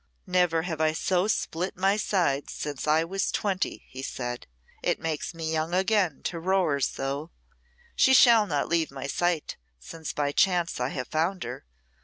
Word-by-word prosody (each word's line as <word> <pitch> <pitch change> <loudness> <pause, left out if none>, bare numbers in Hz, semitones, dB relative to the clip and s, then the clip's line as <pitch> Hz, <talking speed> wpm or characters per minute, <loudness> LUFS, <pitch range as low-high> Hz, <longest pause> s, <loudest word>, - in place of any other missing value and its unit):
"Never 180 -3 +2
have 160 -3 -3
I 155 0 +3
so 180 +3 +1
split 180 -4 -2
my 195 +2 +3
sides 175 -9 0
since 145 -1 -5
I 155 +2 +4
was 190 +3 -1
twenty," 195 -3 -2
he 130 - -8
said. 120 -2 -5 0.3
"It - - 0
makes 160 +1 -3
me 160 -1 -3
young 160 +2 -1
again 190 -5 +1
to 170 - -3
roar 180 -5 +1
so. 140 +3 -2 0.7
She 265 -2 +5
shall 230 -4 +7
not 145 -5 0
leave 165 -1 +1
my 135 -1 -7
sight, 170 +3 -1 0.2
since 160 - -7
by 145 -1 -1
chance 175 0 +2
I 125 +1 0
have 125 -3 -5
found 170 +4 0
her. - - -7
165 Hz, 170 wpm, -27 LUFS, 145-185 Hz, 0.7 s, shall